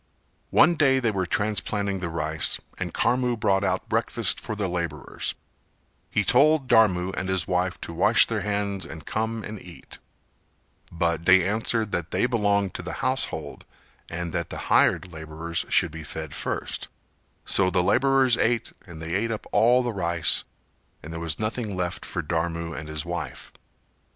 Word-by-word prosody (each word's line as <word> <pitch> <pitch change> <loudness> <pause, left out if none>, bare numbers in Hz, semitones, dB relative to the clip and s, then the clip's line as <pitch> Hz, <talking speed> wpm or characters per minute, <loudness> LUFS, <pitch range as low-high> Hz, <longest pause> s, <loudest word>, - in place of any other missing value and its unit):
One 175 - +5
day 135 -5 +3
they 120 -3 +1
were 95 -3 -2
transplanting 100 -1 -1
the 90 -2 -3
rice 85 - -1 0.2
and - - -3
Karmu 125 -1 +1
brought 100 -2 +2
out 95 -1 -1
breakfast - - 0
for 110 - -5
the 105 -2 -1
labourers; 85 -1 -3 0.7
he 105 - +1
told 140 - +4
Dharmu 95 -6 +4
and 95 - -3
his 95 -3 0
wife 90 0 0
to 85 - -6
wash 85 - +5
their 110 -3 -2
hands 100 -1 -2
and 80 -1 -9
come 110 0 -2
and 105 -1 -7
eat; 90 -1 -12 0.9
but 85 -1 -1
they 95 -1 +6
answered 110 +1 0
that 85 -1 -2
they - - +1
belonged 100 -5 +1
to - - -5
the - - -5
household - - -1 0.5
and 85 0 -4
that 85 -2 -2
the - - -5 0.2
hired 90 -3 +3
labourers 80 +1 -3
should 85 - +3
be 80 0 -8
fed 80 -1 -6
first, - - -3 0.6
so 95 -1 +3
the 90 -1 +2
labourers 135 +2 +3
ate 115 0 +1
and 80 -2 -9
they 85 +1 -4
ate 105 +5 0
up 110 -2 -4
all 125 +3 +4
the 120 -2 -2
rice 85 -4 +1 0.6
and 80 +2 -8
there 80 - -5
was 85 -1 -2
nothing 110 -2 -3
left 90 0 -3
for 85 - -3
Dharmu 85 +1 -2
and 75 -1 -7
his 75 +1 -4
wife. 85 -2 -5
95 Hz, 170 wpm, -25 LUFS, 85-110 Hz, 0.9 s, they